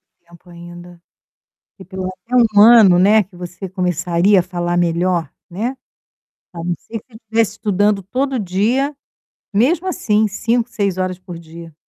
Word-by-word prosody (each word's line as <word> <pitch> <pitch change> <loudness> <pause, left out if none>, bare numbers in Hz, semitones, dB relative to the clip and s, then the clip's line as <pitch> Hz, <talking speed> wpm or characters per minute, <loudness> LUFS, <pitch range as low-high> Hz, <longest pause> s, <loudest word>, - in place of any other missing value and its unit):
to 185 - -55
tempo 170 +1 -18
ainda, 175 0 -12 0.7
porque 190 - -15
pelo 185 0 -5 0.5
meno 205 - +6
ano, 215 -5 +7
né, 210 +4 +5
que 185 0 -20
você 175 +2 -8
começaria 180 +1 +1
a - - -1
falar 175 -1 -3
melhor, 175 -2 0 0.2
né, 230 +9 -3 0.8
a 175 - -10
não 175 0 -1
ser 225 -1 -8
que 235 - -27
estivesse 225 -1 -1
estudando 205 0 0
todo 260 +7 -2
dia, 230 +9 0 0.6
mesmo 310 - +2
assim, 215 - +1
5, 230 +4 -1
6 200 -5 -2
horas 185 -1 -2
por 180 -2 -10
dia. 165 0 -12
185 Hz, 150 wpm, -18 LUFS, 175-220 Hz, 0.8 s, ano